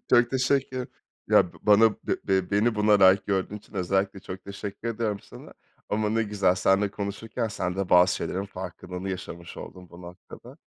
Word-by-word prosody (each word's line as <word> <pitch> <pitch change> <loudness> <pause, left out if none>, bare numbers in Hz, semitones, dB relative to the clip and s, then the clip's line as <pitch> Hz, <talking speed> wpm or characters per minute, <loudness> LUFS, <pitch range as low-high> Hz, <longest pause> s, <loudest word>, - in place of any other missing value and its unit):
Çok 120 -1 +5
teşekkür. 130 -1 0 0.4
Ya 85 - +4
b - - -14
bana 110 +2 +6
be - - -5 0.2
be 95 -1 +1
beni 105 +3 +2
buna 105 -1 +4
layık 95 0 +6
gördüğün 100 +1 -1
için 105 - -22
özellikle 95 +1 -1
çok 90 0 -9
teşekkür 100 +3 -6
ediyorum 110 -3 -2
sana - - -13 0.3
ama 105 0 0
ne 115 +1 +1
güzel, 100 -4 +1
seninle 95 +2 +2
konuşurken 110 +3 -4
sen 90 -3 -3
de 100 -2 -2
bazı 90 +1 +5
şeylerin 95 +2 -3
farkındalığını 90 0 -7
yaşamış 85 -2 -7
oldun 90 -1 -10
bu 85 +1 -13
noktada. 90 0 -12
100 Hz, 175 wpm, -26 LUFS, 95-110 Hz, 0.4 s, bana